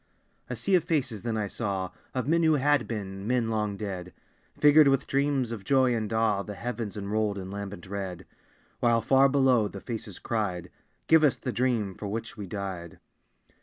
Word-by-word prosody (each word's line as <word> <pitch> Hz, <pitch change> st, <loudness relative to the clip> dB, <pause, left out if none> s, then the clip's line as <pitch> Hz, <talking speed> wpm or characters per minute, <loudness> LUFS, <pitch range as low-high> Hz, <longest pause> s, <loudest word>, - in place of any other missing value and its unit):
A -, -, -3 dB
sea 195 Hz, -, -1 dB
of 180 Hz, -4 st, +5 dB
faces 135 Hz, -, -1 dB
then 115 Hz, -1 st, -2 dB
I 105 Hz, -, 0 dB
saw, 100 Hz, -3 st, -3 dB, 0.2 s
Of 130 Hz, 0 st, -1 dB
men 165 Hz, +2 st, +3 dB
who 160 Hz, -2 st, +4 dB
had 145 Hz, -2 st, +2 dB
been, 100 Hz, -3 st, -5 dB
men 120 Hz, -2 st, +1 dB
long 105 Hz, -2 st, -1 dB
dead. 95 Hz, -4 st, -5 dB, 0.5 s
Figured 150 Hz, 0 st, +7 dB
with 135 Hz, -1 st, +3 dB
dreams 140 Hz, -3 st, 0 dB
of 110 Hz, -4 st, -5 dB
joy 130 Hz, +1 st, +3 dB
and 110 Hz, -2 st, -2 dB
awe 110 Hz, -3 st, +2 dB
The 105 Hz, 0 st, -7 dB
heavens 115 Hz, +1 st, -4 dB
unrolled 105 Hz, 0 st, -1 dB
in 95 Hz, -1 st, -6 dB
lambent 100 Hz, -3 st, -6 dB
red; 95 Hz, -2 st, -5 dB, 0.5 s
While 115 Hz, -2 st, +3 dB
far 135 Hz, +3 st, +5 dB
below 130 Hz, -5 st, +3 dB
the 100 Hz, -, -8 dB
faces 110 Hz, -3 st, -6 dB
cried 95 Hz, -6 st, -3 dB, 0.3 s
"Give 160 Hz, -1 st, +5 dB
us 145 Hz, -, +4 dB
the 125 Hz, -, -4 dB
dream 115 Hz, -6 st, 0 dB
for 105 Hz, -, -7 dB
which 115 Hz, +3 st, -4 dB
we 105 Hz, -2 st, -7 dB
died!" 95 Hz, -3 st, -5 dB
110 Hz, 185 wpm, -28 LUFS, 100-130 Hz, 0.5 s, Figured